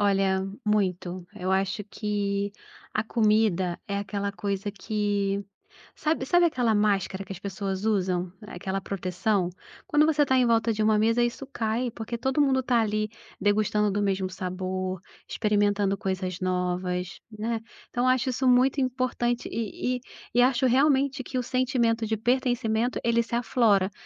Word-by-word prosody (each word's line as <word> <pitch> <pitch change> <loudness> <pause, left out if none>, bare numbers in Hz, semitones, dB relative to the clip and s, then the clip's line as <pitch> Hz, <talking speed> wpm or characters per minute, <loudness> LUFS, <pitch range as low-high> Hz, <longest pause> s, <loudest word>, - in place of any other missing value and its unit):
Olha, 195 -1 +2 0.2
muito. 185 -4 0
Eu 185 +1 -3
acho 190 +2 0
que, 205 -1 -2 0.4
a 215 - +2
comida 215 -6 +2
é 200 -1 -2
aquela 200 0 -2
coisa 200 0 -3
que, 200 -1 -1 0.5
sabe 310 -4 0
sabe 350 +5 +4
aquela 245 -7 +1
máscara 200 -2 +1
que 195 - -11
as 190 - -5
pessoas 195 0 -4
usam? 185 -4 0
Aquela 190 +1 -4
proteção? 185 0 -1 0.3
Quando 300 0 +4
você 305 -2 +3
está 260 -2 +2
em 250 -1 +4
volta 230 0 +3
de 215 - -2
uma 215 0 +4
mesa 225 +3 +3
isso 240 +3 -2
cai, 230 +2 -1
porque 225 +1 -5
todo 265 +4 +1
mundo 265 -2 +3
tá 245 -2 +2
ali, 215 0 0 0.3
degustando 210 +1 +2
do 205 +1 0
mesmo 190 -2 0
sabor, 185 0 -3 0.3
experimentando 205 -2 +1
coisas 190 -3 -3
novas, 180 -1 -2
né. 225 +2 -2 0.3
Então 245 +1 +1
acho 260 +1 +2
isso 260 +1 0
muito 255 +2 +4
importante 250 -2 -1
e 230 +3 -2
e - - -12 0.3
e 245 - +5
acho 255 +1 +3
realmente 270 +1 +3
que 255 - -4
o 250 - 0
sentimento 240 -3 +1
de 220 0 0
pertencimento, 245 0 +1
ele 235 0 +3
se 235 0 -4
aflora, 220 -5 +2
210 Hz, 155 wpm, -27 LUFS, 195-245 Hz, 0.5 s, e